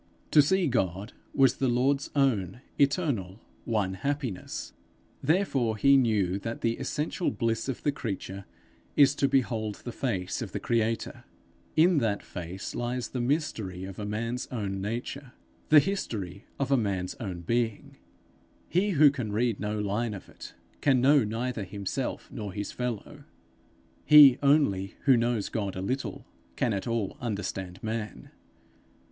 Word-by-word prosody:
To 150 - +8
see 185 +5 +2
God 100 - -1 0.2
was 135 -3 +4
the 135 - +1
Lord's 135 +4 +1
own, 120 - +1 0.2
eternal, 140 - +1 0.3
one 105 -5 0
happiness; 130 - -4 0.5
therefore 140 - +1
he 140 +5 +5
knew 105 -7 +2
that 115 +3 -5
the 115 0 0
essential 155 +4 -1
bliss 115 +1 -1
of 130 - -4
the 145 - +2
creature 100 -7 -5 0.5
is 140 -1 +6
to 140 - +1
behold 115 -6 0
the 120 - -8
face 105 -8 -2
of - - -6
the - - -2
creator. 115 -1 -1 0.5
In 170 0 +5
that 110 -5 -1
face 90 +1 -6
lies 120 +1 -3
the 125 - -3
mystery 115 - -1
of 95 +1 -7
a 105 - -3
man's 115 +4 -3
own 100 -5 -3
nature, 120 +5 -5 0.4
the 155 - +9
history 110 - -3
of 140 0 -2
a 135 - +5
man's 95 -5 -1
own 95 -6 -5
being. 115 +4 -2 0.7
He 195 +3 +2
who 145 -1 +8
can 125 -6 -4
read 115 0 0
no 105 +1 -2
line 105 +2 -1
of 95 - -10
it, - - -11 0.3
can 135 -3 +4
know 140 +1 +5
neither 115 +1 -2
himself 100 +1 -4
nor 105 -3 -6
his 100 +1 -4
fellow; 125 -4 -5 0.8
he 145 -4 +9
only 140 -10 +2
who 135 -2 +5
knows 115 -3 0
God 100 -4 -3
a - - -4
little, 130 +8 -3 0.3
can 120 -4 +1
at 100 +2 -3
all 115 -4 -2
understand 95 -5 -4
man. 110 - -5
115 Hz, 150 wpm, -28 LUFS, 100-135 Hz, 0.8 s, the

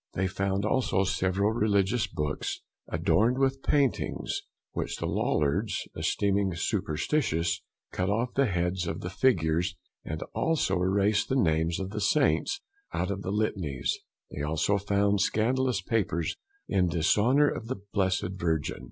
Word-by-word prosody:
They 95 - 0
found 95 +2 -1
also 105 -4 +2
several 95 +2 +1
religious 105 -1 +2
Books, 75 -5 -3 0.3
adorned 115 +5 +2
with 135 0 +1
paintings, 140 -3 0 0.3
which - - -3
the - - -3
Lollards 80 +9 0
esteeming 100 -2 +1
superstitious, 85 - 0 0.3
cut 90 +1 -1
off 115 +5 0
the 140 -1 +3
Heads 90 -1 -1
of 80 - -3
the 90 - -5
Figures, 85 -7 +2 0.3
and 80 0 -4
also 120 - +1
erased 100 +3 +2
the 130 - +1
Names 80 -7 +2
of 95 0 -4
the 105 0 -3
Saints 150 - +2 0.3
out 90 - -1
of 100 0 -3
the 95 - -3
litanies; 95 - -1 0.3
they 70 - -5
also 80 +7 +1
found 100 0 +2
scandalous 120 0 +1
Papers 90 -7 0 0.3
in 90 -2 +2
Dishonour 105 - +3
of 115 - -5
the 130 -3 -4
blessed 95 0 +1
Virgin. 80 -5 -1
95 Hz, 140 wpm, -28 LUFS, 85-110 Hz, 0.3 s, the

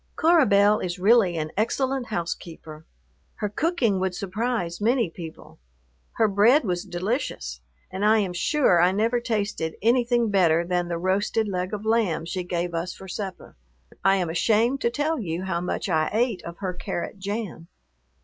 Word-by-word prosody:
Cora 325 -3 +4
Belle 205 +1 +4
is 175 -1 -3
really 195 -2 +4
an 155 0 -3
excellent 260 +4 0
housekeeper. 165 -4 -6 0.5
Her 210 - -3
cooking 245 - 0
would 185 -1 -1
surprise 205 -2 -3
many 230 -4 +2
people. 165 - -10 0.5
Her 220 - +3
bread 215 +9 +4
was 175 -2 -1
delicious, 175 - -3 0.3
and 190 +2 -4
I 215 +1 +5
am 195 -4 0
sure 180 - +3
I 180 +2 +4
never 225 +4 +1
tasted 210 -8 -2
anything 240 -1 +2
better 170 -4 +3
than 175 0 -1
the 170 -1 -2
roasted 200 +5 0
leg 185 -1 -2
of 210 0 -5
lamb 220 -8 +1
she 180 +2 -3
gave 175 -1 -3
us 170 +2 -3
for 190 - -11
supper. 190 0 -6 0.5
I 195 0 +5
am 180 -4 -1
ashamed 225 +9 +2
to 235 - +2
tell 295 +6 -1
you 175 -4 -3
how 170 -3 -2
much 180 - -3
I 160 -4 +1
ate 225 -1 0
of 170 0 -8
her 190 -2 -3
carrot 175 +2 -5
jam. 200 -4 -5
195 Hz, 170 wpm, -25 LUFS, 175-230 Hz, 0.5 s, I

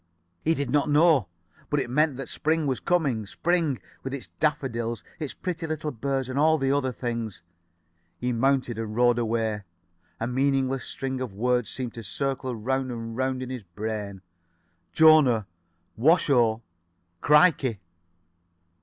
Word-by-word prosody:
He 165 +1 +2
did 140 -2 -2
not 145 0 +2
know. 150 - +4 0.4
But 145 - +1
it 135 - -2
meant 145 +2 +1
that 135 -2 -5
spring 160 0 0
was 130 -3 0
coming. 140 - 0
Spring, 165 - 0 0.2
with 135 +1 -4
its 130 - -7
daffodils, 120 -8 -1 0.2
its 150 -4 -4
pretty 170 -3 -4
little 155 -1 -3
birds 135 +1 -2
and 130 +2 -2
all 160 +1 +4
the 135 -2 0
other 140 -2 +1
things. 115 -5 -4 0.8
[Pg 125 0 -1
66]He - - -2
mounted 130 -3 +1
and 110 -1 -4
rode 120 0 +4
away. 110 -2 -1 0.6
A 115 - -1
meaningless 135 +1 0
string 130 -1 -4
of 120 -7 -5
words 125 +1 +1
seemed 125 -3 -5
to 115 - -8
circle 130 +3 -3
round 130 +3 -1
and 115 -1 -6
round 130 0 -1
in 130 - -6
his 130 -2 -5
brain. 100 +1 -5 0.7
"Jona. 145 - +6 0.5
Washo. 120 -5 +3 0.6
Crikey." 150 - +4
130 Hz, 150 wpm, -26 LUFS, 115-145 Hz, 0.8 s, Jona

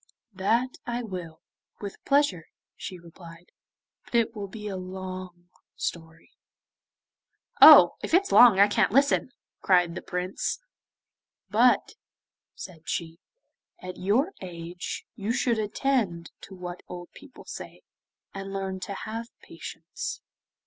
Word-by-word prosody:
'That 230 +7 0
I 240 0 -2
will, 180 -7 -7 0.4
with 200 -1 -8
pleasure,' 275 - +2 0.3
she 185 - -7
replied. 170 0 -14 0.5
'But - - -7
it 230 0 +2
will 205 -2 -5
be 210 +1 -8
a 200 - -4
long 185 -1 -8 0.2
story.' 165 -1 -6 1.3
'Oh! - - +10
if - - -5
it's 395 +2 +2
long, 235 -6 +8
I 200 - +8
can't 210 -1 +2
listen,' 275 +2 +3 0.3
cried 180 -3 +3
the - - -6
Prince. 180 +1 -3 0.9
'But,' - - +4 0.6
said 170 -4 -10
she, 165 -1 -3 0.6
'at 185 0 -8
your 220 - +1
age, 175 -1 -6
you 215 -1 -2
should 235 -2 +1
attend 210 -6 -1
to 195 - -12
what 180 -1 -7
old 175 -1 -9
people 290 -3 -15
say, - - -9 0.5
and 195 0 -6
learn 190 -1 -3
to 200 +2 -5
have 225 +3 -5 0.2
patience. - - -7
190 Hz, 125 wpm, -27 LUFS, 175-225 Hz, 1.3 s, Oh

